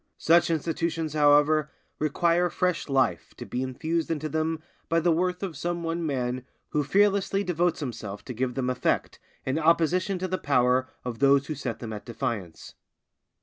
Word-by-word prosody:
Such 170 Hz, +2 st, +4 dB
institutions, 165 Hz, 0 st, -1 dB
however, 150 Hz, 0 st, +4 dB, 0.3 s
require 170 Hz, +3 st, +2 dB
fresh 180 Hz, -1 st, -1 dB
life 130 Hz, -11 st, 0 dB
to -, -, -7 dB
be 125 Hz, -, -3 dB
infused 160 Hz, +6 st, -2 dB
into 155 Hz, -1 st, -2 dB
them 160 Hz, +1 st, -1 dB, 0.3 s
by 165 Hz, -, +3 dB
the 170 Hz, +1 st, +2 dB
worth 180 Hz, +3 st, 0 dB
of 180 Hz, -5 st, -4 dB
some 170 Hz, +3 st, -3 dB
one 165 Hz, +1 st, -2 dB
man 130 Hz, -4 st, -2 dB, 0.3 s
who 150 Hz, -, 0 dB
fearlessly 200 Hz, +4 st, +2 dB
devotes 175 Hz, -2 st, 0 dB
himself 115 Hz, -6 st, -6 dB
to 125 Hz, -, -5 dB
give 125 Hz, +1 st, -2 dB
them 130 Hz, -1 st, 0 dB
effect 125 Hz, 0 st, -1 dB, 0.3 s
in 135 Hz, +4 st, 0 dB
opposition 170 Hz, +4 st, +2 dB
to 185 Hz, +1 st, -2 dB
the 185 Hz, 0 st, -2 dB
power 130 Hz, -1 st, +2 dB, 0.2 s
of 120 Hz, -2 st, -4 dB
those 140 Hz, 0 st, +4 dB
who 155 Hz, -, -3 dB
set 120 Hz, -5 st, -4 dB
them 115 Hz, -2 st, -6 dB
at 105 Hz, -, -7 dB
defiance. 115 Hz, -8 st, -5 dB
155 Hz, 170 wpm, -27 LUFS, 130-170 Hz, 0.3 s, Such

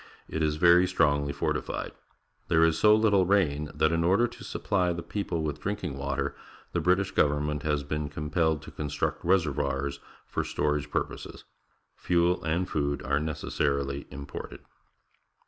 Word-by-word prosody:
It 80 Hz, -, -3 dB
is 75 Hz, -1 st, +1 dB
very 85 Hz, +3 st, +6 dB
strongly 70 Hz, -5 st, +2 dB
fortified. -, -, -2 dB, 0.6 s
There 80 Hz, 0 st, +4 dB
is 80 Hz, -1 st, +3 dB
so 105 Hz, 0 st, +7 dB
little 105 Hz, -4 st, +3 dB
rain 75 Hz, -7 st, +2 dB
that, 80 Hz, -, +3 dB
in 85 Hz, 0 st, +1 dB
order 100 Hz, +8 st, +4 dB
to 120 Hz, -, -12 dB
supply 90 Hz, -4 st, 0 dB
the 85 Hz, 0 st, -4 dB
people 90 Hz, -6 st, -3 dB
with 75 Hz, -1 st, -3 dB
drinking 100 Hz, -7 st, -3 dB
water, 70 Hz, 0 st, -2 dB, 0.4 s
the -, -, 0 dB
British 90 Hz, +2 st, +2 dB
government 75 Hz, 0 st, +1 dB
has 75 Hz, -1 st, 0 dB
been 75 Hz, +1 st, -3 dB
compelled 80 Hz, +1 st, 0 dB
to -, -, -10 dB
construct 75 Hz, -1 st, -3 dB
reservoirs 70 Hz, -6 st, 0 dB, 0.3 s
for -, -, -2 dB
storage 75 Hz, -1 st, -1 dB
purposes. -, -, -4 dB, 0.5 s
Fuel 90 Hz, +1 st, +1 dB
and 85 Hz, +4 st, 0 dB
food 70 Hz, -1 st, -1 dB
are 70 Hz, +1 st, +1 dB
necessarily 70 Hz, -2 st, -2 dB
imported. 70 Hz, +1 st, -8 dB
75 Hz, 145 wpm, -28 LUFS, 70-90 Hz, 0.6 s, so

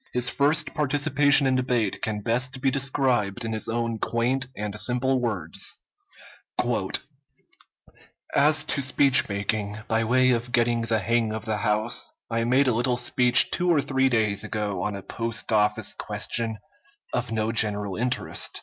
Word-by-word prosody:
His 125 Hz, 0 st, +2 dB
first 145 Hz, +3 st, +1 dB
participation 145 Hz, 0 st, +2 dB
in 130 Hz, -1 st, +2 dB
debate 125 Hz, -5 st, -1 dB
can 105 Hz, -1 st, -3 dB
best 125 Hz, +4 st, -1 dB
be 135 Hz, 0 st, +1 dB
described 130 Hz, -6 st, 0 dB
in 115 Hz, -, -3 dB
his 110 Hz, -, -2 dB
own 115 Hz, -1 st, -2 dB
quaint 125 Hz, +4 st, -1 dB
and 105 Hz, 0 st, -4 dB
simple 130 Hz, +2 st, 0 dB
words: 95 Hz, -9 st, -2 dB, 2.6 s
"As 150 Hz, +1 st, +4 dB
to 150 Hz, -2 st, 0 dB
speech 135 Hz, -2 st, +4 dB
making, 105 Hz, +1 st, -3 dB
by 115 Hz, 0 st, +1 dB
way 130 Hz, +3 st, +3 dB
of 120 Hz, 0 st, -2 dB
getting 120 Hz, -1 st, +1 dB
the 115 Hz, 0 st, 0 dB
hang 115 Hz, +1 st, 0 dB
of 110 Hz, 0 st, -6 dB
the 110 Hz, -2 st, -2 dB
House, 105 Hz, +2 st, -1 dB, 0.2 s
I 115 Hz, 0 st, 0 dB
made 130 Hz, +3 st, +3 dB
a 125 Hz, -, +2 dB
little 120 Hz, +2 st, 0 dB
speech 125 Hz, 0 st, +4 dB
two 180 Hz, 0 st, 0 dB
or 165 Hz, -4 st, +4 dB
three 135 Hz, -1 st, +1 dB
days 110 Hz, -4 st, +1 dB
ago 105 Hz, -4 st, -3 dB
on 105 Hz, +2 st, -3 dB
a 100 Hz, -, -8 dB
post 115 Hz, 0 st, -3 dB
office 105 Hz, -1 st, +2 dB
question 115 Hz, -2 st, -2 dB, 0.6 s
of 120 Hz, -1 st, -2 dB
no 110 Hz, 0 st, -1 dB
general 105 Hz, -3 st, +1 dB
interest. 125 Hz, +4 st, -2 dB
120 Hz, 155 wpm, -25 LUFS, 110-130 Hz, 2.6 s, As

